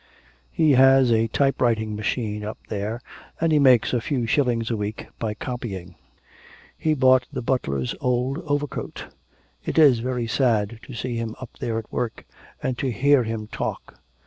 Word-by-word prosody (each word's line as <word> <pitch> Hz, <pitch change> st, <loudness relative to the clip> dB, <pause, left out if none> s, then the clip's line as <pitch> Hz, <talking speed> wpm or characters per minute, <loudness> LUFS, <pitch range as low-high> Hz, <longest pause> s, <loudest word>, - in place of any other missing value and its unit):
He 155 Hz, -2 st, +3 dB
has 135 Hz, -1 st, +6 dB
a 115 Hz, 0 st, +3 dB
type 135 Hz, +4 st, +1 dB
writing 110 Hz, -3 st, +1 dB
machine 105 Hz, 0 st, -2 dB
up 105 Hz, +1 st, -5 dB
there, 105 Hz, +3 st, -3 dB, 0.4 s
and 165 Hz, 0 st, +2 dB
he 150 Hz, -, +4 dB
makes 130 Hz, -5 st, +5 dB
a 120 Hz, -, +1 dB
few 125 Hz, -1 st, -1 dB
shillings 120 Hz, -3 st, +1 dB
a -, -, +1 dB
week 105 Hz, 0 st, -4 dB
by 110 Hz, -2 st, -2 dB
copying; 100 Hz, -9 st, -6 dB, 0.8 s
he 155 Hz, -1 st, 0 dB
bought 130 Hz, -2 st, +4 dB
the -, -, -4 dB
butler's 70 Hz, -, -1 dB
old 125 Hz, +3 st, 0 dB
overcoat... 145 Hz, -1 st, -3 dB, 0.5 s
It -, -, -4 dB
is 140 Hz, -7 st, +6 dB
very 125 Hz, 0 st, -2 dB
sad 115 Hz, -3 st, +1 dB
to 130 Hz, -, -8 dB
see 120 Hz, +1 st, -3 dB
him 115 Hz, -1 st, -4 dB
up 130 Hz, -, -8 dB
there 115 Hz, -1 st, -2 dB
at 115 Hz, -, -6 dB
work, 120 Hz, -2 st, -3 dB, 0.4 s
and 130 Hz, -2 st, -2 dB
to 130 Hz, -, 0 dB
hear 140 Hz, +3 st, +4 dB
him 110 Hz, -1 st, -3 dB
talk.... 105 Hz, -, -5 dB
120 Hz, 170 wpm, -24 LUFS, 110-130 Hz, 0.8 s, has